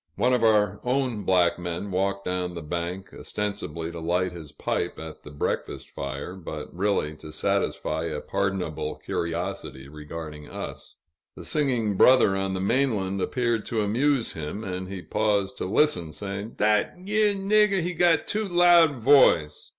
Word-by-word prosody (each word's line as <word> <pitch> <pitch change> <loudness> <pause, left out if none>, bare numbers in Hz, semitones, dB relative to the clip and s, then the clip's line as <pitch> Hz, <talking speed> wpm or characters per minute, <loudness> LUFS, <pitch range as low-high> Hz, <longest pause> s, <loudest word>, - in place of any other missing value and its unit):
One 125 +6 +2
of 125 -2 +2
our 105 -3 +3
own 125 -4 -1
black 90 -2 +3
men 85 +3 -4
walked 100 +1 -1
down 90 -1 -2
the 85 - -6
bank, 85 +4 -4
ostensibly 85 -6 -4
to 85 - -7
light 90 +3 0
his 80 -4 -9
pipe - - -2
at 80 -1 -8
the - - -11
breakfast 75 -1 -3
fire, 70 +5 -5
but 80 -5 -7
really 90 -5 0
to 75 - -10
satisfy 80 +1 -1
a 80 -3 -3
pardonable 85 -7 -2
curiosity 85 -5 -4
regarding 75 0 -8
us. - - -7 0.4
The - - -10
singing 120 -9 0
brother 125 -6 +6
on 95 0 -1
the - - -2
mainland 100 -3 0
appeared 120 -2 0
to 110 -2 0
amuse 125 +4 +1
him, 80 +7 -5
and 95 -1 -4
he 95 -1 -7
paused 105 -3 0
to - - -2
listen, 90 - +1
saying, 100 +4 -5
"Dat 105 0 +2
yere 205 +2 +1
nigger, 200 -1 +3
he 180 +1 -2
got 170 -1 +3
too 215 0 -2
loud 175 -3 +6
voice!" 120 - +4
95 Hz, 160 wpm, -26 LUFS, 85-125 Hz, 0.4 s, brother